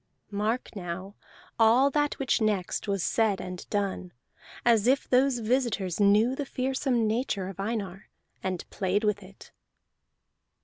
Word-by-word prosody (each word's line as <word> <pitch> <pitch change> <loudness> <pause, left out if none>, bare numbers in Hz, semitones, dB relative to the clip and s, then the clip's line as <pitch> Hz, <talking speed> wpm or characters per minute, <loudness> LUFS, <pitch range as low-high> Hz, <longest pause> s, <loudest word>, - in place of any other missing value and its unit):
Mark 215 +4 -2
now 185 +1 -6 0.5
all 240 +5 +5
that 295 +1 0
which 265 -3 0
next 210 -2 0
was 195 -3 0
said 220 -4 +1
and 180 -1 -7
done, 195 -3 -2 0.5
as 230 -2 +4
if 270 +2 +2
those 260 0 +3
visitors 225 -6 0
knew 210 +5 +4
the 285 - -2
fearsome 260 -2 0
nature 215 -4 -1
of 195 - -10
Einar, 195 -3 -4 0.3
and 185 -2 -3
played 195 +2 0
with 210 -1 +1
it. 190 0 -15
215 Hz, 135 wpm, -28 LUFS, 195-245 Hz, 0.5 s, all